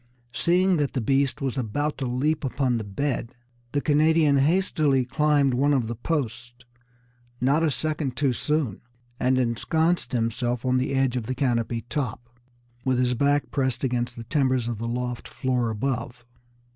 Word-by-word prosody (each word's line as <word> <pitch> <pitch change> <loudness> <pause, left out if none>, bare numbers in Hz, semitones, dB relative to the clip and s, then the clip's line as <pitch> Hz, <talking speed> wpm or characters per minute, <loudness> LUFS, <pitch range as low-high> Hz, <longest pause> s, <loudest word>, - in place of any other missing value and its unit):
Seeing 180 +1 +3
that 145 -2 -1
the 130 - 0
beast 135 +3 +1
was 135 -1 -1
about 145 +6 -2
to 135 - -2
leap 150 +6 0
upon 130 -3 0
the - - -4
bed, 125 +3 -3 0.4
the 145 - 0
Canadian 155 -1 +3
hastily 150 -3 +2
climbed 145 0 +2
one 140 +3 +3
of 125 -4 +1
the 115 - -3
posts, 120 -2 -4 0.7
not 140 +5 +2
a 165 - +3
second 150 -3 -2
too 140 -3 +2
soon, 145 -6 -1 0.4
and 130 +1 +2
ensconced 160 +8 +1
himself 120 0 -1
on 130 0 +2
the 135 +1 -1
edge 135 -2 +1
of 120 -3 -3
the 130 - -2
canopy 120 -3 0
top, 120 -2 -4 0.5
with 130 -1 +1
his 125 0 +2
back 140 +3 +1
pressed 130 -2 -1
against 120 -2 -1
the 115 - -7
timbers 130 -1 +1
of 115 -3 -3
the 115 - -3
loft 125 0 -3
floor 125 -3 -1
above. 120 +1 -3
130 Hz, 165 wpm, -25 LUFS, 120-145 Hz, 0.7 s, Seeing